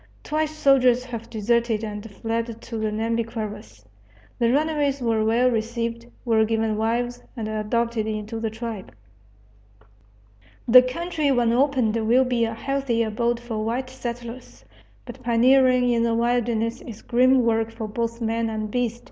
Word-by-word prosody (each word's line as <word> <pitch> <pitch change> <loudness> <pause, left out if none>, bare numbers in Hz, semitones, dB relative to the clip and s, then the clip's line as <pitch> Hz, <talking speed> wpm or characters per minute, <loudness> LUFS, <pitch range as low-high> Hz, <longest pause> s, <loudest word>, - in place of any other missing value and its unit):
Twice 310 0 -1
soldiers 255 -4 +4
have 235 -3 -7
deserted 230 0 0
and 210 0 -6
fled 230 +2 -4
to 230 - -7
the 215 0 0
Nhambiquaras. 220 - -4 0.5
The 235 0 +3
runaways 290 -1 +1
were 225 -3 +1
well 235 +3 +3
received, 230 +1 -3 0.2
were 225 -2 +3
given 220 0 0
wives, 235 +3 -1 0.2
and 220 -2 -3
adopted 220 +1 -1
into 215 +1 -4
the 225 0 -2
tribe. 220 - -7 1.7
The 250 +2 +9
country 305 +3 -1
when 240 -3 +2
opened 255 -4 +2
will 255 +3 +4
be 245 -2 +1
a 225 - -3
healthy 270 -2 -1
abode 235 +2 -1
for 230 -3 -4
white 250 +3 -2
settlers. 235 - -8 0.4
But - - -10
pioneering 250 +1 +4
in 235 -1 +2
the 230 0 +1
wilderness 235 -1 0
is 220 -3 -10
grim 255 +1 +4
work 225 -1 +1
for 225 -1 -6
both 230 +2 -3
man 225 0 -1
and 215 -1 -4
beast. 240 -1 -1
230 Hz, 150 wpm, -24 LUFS, 225-245 Hz, 1.7 s, The